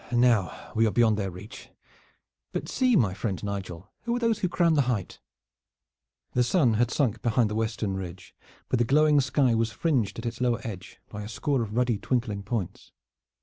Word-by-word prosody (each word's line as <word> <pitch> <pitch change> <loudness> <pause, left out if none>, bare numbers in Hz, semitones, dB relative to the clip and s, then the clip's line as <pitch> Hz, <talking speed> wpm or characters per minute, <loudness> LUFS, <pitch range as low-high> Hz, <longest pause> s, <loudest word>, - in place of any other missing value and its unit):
Now 120 -7 +1
we 115 0 +4
are - - 0
beyond 110 -2 +3
their 100 -2 -1
reach! 95 +7 -11 0.8
But - - -3
see, 255 -2 +2
my 105 - +3
friend 95 -1 -3
Nigel, 95 -4 -5
who 235 0 -1
are - - -1
those 230 -3 +1
who 185 - 0
crown 170 -1 +3
the 145 - +4
height?" 105 -7 -3 1.1
The 125 - +3
sun 125 -3 +3
had 120 +2 +2
sunk 115 -7 0
behind 115 -2 +2
the - - -2
western 110 -3 -1
ridge, 90 -3 -8 0.3
but 125 - 0
the - - +4
glowing 150 +3 +4
sky 130 -2 +2
was 115 0 +1
fringed 120 - 0
at 115 - -6
its 120 +1 -4
lower 120 -2 +1
edge 95 -5 -8
by 105 - -7
a 105 - -7
score 135 +3 -1
of 110 -1 -4
ruddy 120 -3 +1
twinkling 115 -4 -1
points. 100 -2 -4
115 Hz, 190 wpm, -27 LUFS, 105-130 Hz, 1.1 s, we